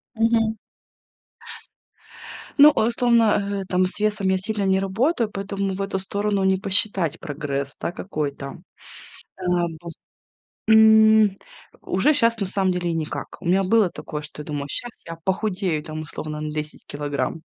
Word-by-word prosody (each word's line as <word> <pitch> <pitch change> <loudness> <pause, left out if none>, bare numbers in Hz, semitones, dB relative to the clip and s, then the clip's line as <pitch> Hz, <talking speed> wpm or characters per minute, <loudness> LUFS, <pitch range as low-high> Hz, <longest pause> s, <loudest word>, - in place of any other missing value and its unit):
Мгм. 225 0 +2 2.0
Ну, 290 +1 +10
условно, 225 -5 +2
э, - - -4
там 185 0 +2
с 185 - -5
весом 210 -2 0
я 190 - +2
сильно 205 +1 -2
не 190 0 +2
работаю, 225 - 0
поэтому 195 -1 -3
в 195 - -4
эту 195 -1 -2
сторону 200 +1 -1
не 190 0 +3
посчитать 195 -4 +1
прогресс, 140 -2 -4
да, - - -3
какой 155 -6 -3
там. 140 0 -9 0.7
Э, - - -9 0.4
быв 170 -1 -8 0.7
М, 220 -2 +6 0.5
уже 300 - +2
щас 230 -4 +2
на 200 - 0
самом 190 0 0
деле 180 -1 -2
и - - -1
никак. 160 -2 -4
У - - -13
меня 185 +3 +3
было 205 -1 +3
такое, 150 -2 -7
что 150 0 -9
я 150 - -8
думаю, 145 -2 -4
щас 245 - 0 0.2
я 165 0 -7
похудею, 190 -5 -1
там, 155 0 -6
условно, 150 0 -6
на 155 0 -4
10 150 0 -5
килограмм. 145 +2 -3
190 Hz, 155 wpm, -23 LUFS, 160-215 Hz, 2.0 s, Ну